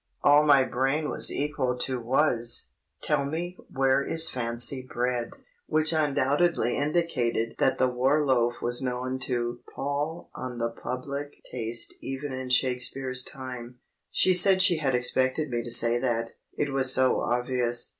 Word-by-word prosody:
All 145 +1 +6
my 140 -2 +6
brain 135 +5 -1
was - - +3
equal 140 -4 -1
to 130 0 -1
was— 120 -1 0 0.3
"Tell - - +1
me, 165 +5 -4 0.2
where 135 +1 +2
is 160 +3 +1
fancy 120 +2 -2
bred?" 125 -1 -2 0.4
which 155 +1 +1
undoubtedly 145 -2 +1
indicated 145 -7 -1
that 130 - +2
the 130 - +3
War 135 +4 +1
Loaf 120 -3 +1
was 120 0 -1
known 130 0 -3
to 120 -2 -2 0.2
pall 145 +4 -3
on 130 -1 -6
the 115 0 -2
public 140 +4 -6
taste 115 -1 -3
even 135 +1 -5
in 130 0 -5
Shakespeare's 130 +1 0
time. 125 -2 -8 0.3
She 185 - +3
said 185 +1 +6
she 175 -2 +3
had 135 -5 0
expected 130 +4 0
me 120 -1 -1
to 120 - -7
say 120 0 +4
that, 115 -2 -1 0.3
it 145 -2 -1
was 130 -1 +3
so 130 -1 +3
obvious. 120 -1 0
130 Hz, 150 wpm, -27 LUFS, 120-145 Hz, 0.4 s, All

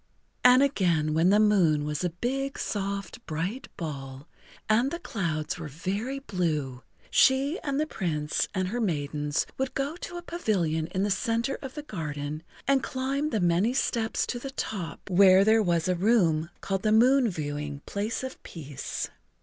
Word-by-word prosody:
And 250 +2 +7
again 170 - +2
when 165 +3 +4
the 205 +2 +5
moon 180 -9 +4
was 150 +2 -2
a 180 - +1
big, 270 +10 -3
soft, 200 -2 -3
bright 180 - -3
ball 135 -4 -6 0.4
and 230 +5 +3
the 340 - -3
clouds 170 - -3
were 160 - -5
very 195 - -3
blue, 155 - -2 0.3
she 275 +5 +4
and 280 -1 -1
the 305 - +2
Prince 155 - -1
and 185 -1 0
her 240 +4 -2
maidens 145 -5 -1
would 265 0 -2
go 280 +3 -1
to 355 - -7
the 345 - -6
pavilion 180 - 0
in 190 +3 -1
the 205 - 0
center 230 +6 0
of 265 -1 -7
the 295 - -5
garden 150 - -5 0.3
and 275 -1 +4
climb 275 +3 -1
the 220 - 0
many 180 +7 +2
steps 230 -4 0
to 245 - -4
the 275 - -6
top, 205 -9 -5
where 190 0 +6
there 220 +1 +5
was 170 -4 +1
a 185 - +3
room 175 -5 +2
called 195 -1 -1
the 215 - +1
moon 250 +3 +5
viewing 145 -4 -4
Place 215 +5 -3
of 260 - -6
Peace. 145 -5 -5
195 Hz, 170 wpm, -27 LUFS, 160-250 Hz, 0.4 s, And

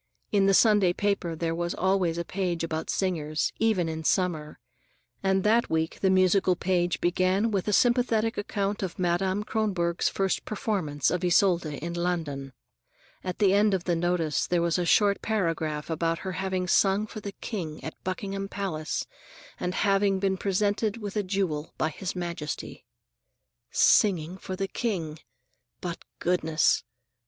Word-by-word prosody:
In 200 -2 +3
the 195 - +5
Sunday 205 -5 +5
paper 195 -4 -1
there 165 0 -1
was 175 +1 -2
always 185 -3 +1
a 170 - -2
page 180 -3 -2
about 160 -1 -3
singers, 155 -5 -1
even 215 -6 +2
in 160 0 -4
summer, 160 -4 0 0.6
and 190 -1 +1
that 225 +3 +3
week 160 0 -1
the 190 - +2
musical 185 0 +4
page 175 -2 0
began 185 +5 +1
with 195 -2 -1
a - - +2
sympathetic 230 -1 +2
account 205 0 -2
of 185 -3 -4
Madame 185 +3 0
Kronborg's 190 -6 0
first 195 -1 -1
performance 170 - -1
of 180 0 -1
Isolde 175 -3 +2
in 170 +4 -5
London. 165 -6 -2 0.7
At 185 - -4
the 195 -3 +4
end 205 0 +4
of 180 - -3
the 175 -1 0
notice, 165 -2 0
there 175 -1 +1
was 170 +1 +1
a 175 - -1
short 200 +1 +4
paragraph 165 -8 -1
about 165 0 0
her 190 - -2
having 185 0 -2
sung 195 +3 +3
for 215 - -8
the 200 -1 -7
King 170 -11 -6
at 155 - -5
Buckingham 195 +1 -3
Palace 180 -6 -3 0.5
and 180 +1 -2
having 195 -1 +2
been 190 0 +1
presented 205 +3 0
with 205 -3 -6
a 210 - +2
jewel 185 -6 -2
by 155 - +1
His 190 +4 -5
Majesty. 170 -4 -5 0.8
Singing 185 -3 +3
for 190 - -5
the 195 +1 -2
King; 175 -9 -3 0.6
but 175 -1 -5 0.2
Goodness! 165 -3 +2
185 Hz, 155 wpm, -27 LUFS, 170-200 Hz, 0.8 s, the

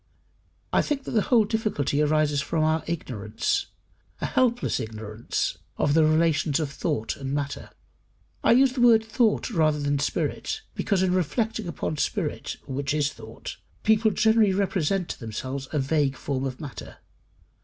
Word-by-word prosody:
I - - +5
think 285 -3 -2
that - - -6
the 220 - +3
whole 225 0 +4
difficulty 205 - 0
arises 150 -1 +2
from 155 +2 0
our 155 0 +2
ignorance 120 -11 -2 0.5
a - - -2
helpless 245 -2 +1
ignorance 110 0 -3 0.2
of 145 - +2
the 160 +1 +5
relations 155 -1 +2
of 150 -3 -2
thought 140 -7 -2
and 135 0 -3
matter. 145 0 -4 0.7
I - - +6
use 260 +1 +5
the 255 - -2
word 225 -2 +6
thought 225 +1 +1
rather 155 -6 +2
than 145 0 0
spirit, 145 - -2
because 200 -4 +1
in 180 -1 +2
reflecting 215 - -1
upon 155 -2 -3
spirit - - -2
(which 140 +2 -2
is 145 -1 +1
thought), 110 -1 -9 0.3
people 220 0 +4
generally 220 -1 +3
represent 190 -2 0
to - - -5
themselves 130 +4 -5
a 155 - -1
vague 140 0 +1
form 135 -1 -2
of 130 -1 -4
matter. 145 -5 -8
155 Hz, 155 wpm, -26 LUFS, 140-210 Hz, 0.7 s, I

